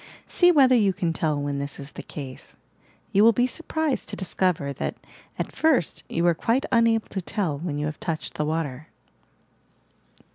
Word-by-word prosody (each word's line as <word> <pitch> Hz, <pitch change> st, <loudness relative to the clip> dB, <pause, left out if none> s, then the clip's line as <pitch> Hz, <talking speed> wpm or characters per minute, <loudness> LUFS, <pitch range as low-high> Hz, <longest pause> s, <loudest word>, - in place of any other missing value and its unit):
See 355 Hz, -1 st, +4 dB
whether 270 Hz, -6 st, +6 dB
you 205 Hz, -5 st, +3 dB
can 170 Hz, -2 st, -1 dB
tell 155 Hz, -3 st, 0 dB
when 145 Hz, -1 st, -2 dB
this 140 Hz, 0 st, -4 dB
is 140 Hz, +1 st, -8 dB
the -, -, -8 dB
case. 135 Hz, -4 st, -9 dB, 0.6 s
You 200 Hz, -, +4 dB
will 230 Hz, +1 st, +7 dB
be 245 Hz, +3 st, +2 dB
surprised 315 Hz, 0 st, -2 dB
to -, -, -2 dB
discover 180 Hz, -6 st, -1 dB
that, -, -, -3 dB, 0.4 s
at -, -, -3 dB
first, 290 Hz, -, +1 dB
you 170 Hz, -, 0 dB
are 175 Hz, -, +5 dB
quite 230 Hz, +10 st, 0 dB
unable 230 Hz, -2 st, +3 dB
to 190 Hz, -, -3 dB
tell 175 Hz, -6 st, -2 dB
when 155 Hz, -3 st, -3 dB
you 150 Hz, -, -1 dB
have 150 Hz, 0 st, -4 dB
touched 160 Hz, -2 st, -4 dB
the 150 Hz, -, -2 dB
water 155 Hz, -2 st, -3 dB
175 Hz, 180 wpm, -25 LUFS, 150-230 Hz, 0.6 s, will